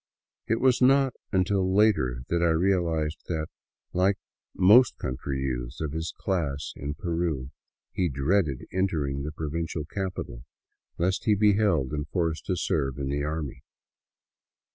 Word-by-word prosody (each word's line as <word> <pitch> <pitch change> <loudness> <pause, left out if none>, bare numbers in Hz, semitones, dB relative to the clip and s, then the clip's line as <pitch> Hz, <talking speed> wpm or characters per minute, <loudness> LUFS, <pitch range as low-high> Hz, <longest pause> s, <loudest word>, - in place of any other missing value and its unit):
It 115 - +1
was 130 -1 +3
not 135 0 +5 0.2
until 95 0 +1
later 65 - +3
that 85 0 +1
I 85 - +4
real 90 +2 +2
ized 80 -1 -1
that, 80 -2 -2 0.4
like 95 +2 +2 0.4
most 110 +7 +6
country 65 +1 -3
youths - - -3
of 80 -2 -2
his 80 +2 -3
class 75 -7 -2
in 70 +2 -5
Peru, 80 -7 -2 0.4
he 90 -2 0
dreaded 70 +1 0
entering 75 -8 0
the 75 +2 -4
provincial 80 0 -3
capital, 90 -10 -5 0.5
lest 95 +6 0
he 105 -3 +4
be 105 0 +4
held 90 -11 +2
and 75 -1 -3
forced 80 -4 -1
to 90 - +1
serve 70 -4 -1
in 70 -1 -3
the 70 +1 -1
army. 75 -3 -4
80 Hz, 145 wpm, -27 LUFS, 70-95 Hz, 0.5 s, most